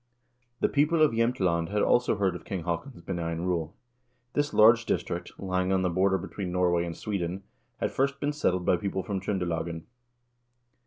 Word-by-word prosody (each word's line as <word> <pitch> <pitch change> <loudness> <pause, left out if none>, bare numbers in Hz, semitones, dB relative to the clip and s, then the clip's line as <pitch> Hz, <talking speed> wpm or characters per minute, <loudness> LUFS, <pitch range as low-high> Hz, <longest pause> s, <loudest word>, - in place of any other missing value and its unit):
The - - +4
people 155 +2 +3
of 155 - +5
Jsemtland 95 -8 +1
had 105 +1 +1
also 120 -2 +3
heard 95 -3 0
of - - -8
King 95 -4 -4
Haakon's 85 - -4
benign 85 -2 -3
rule. 85 -3 -2 0.6
This 145 0 0
large 115 +2 +6
district, 85 +1 -2
lying 95 -1 -1
on 95 -1 +2
the 90 - +1
border 95 +2 +2
between 95 +1 -5
Norway 90 -1 +2
and 85 -1 -6
Sweden, 95 -2 -3 0.3
had - - -1
first 140 +1 0
been 145 +1 -1
settled 90 -11 0
by 90 - +3
people 95 +1 -3
from 95 -1 -3
Tr0ndelagen. 85 -4 -2
95 Hz, 170 wpm, -28 LUFS, 85-110 Hz, 0.6 s, large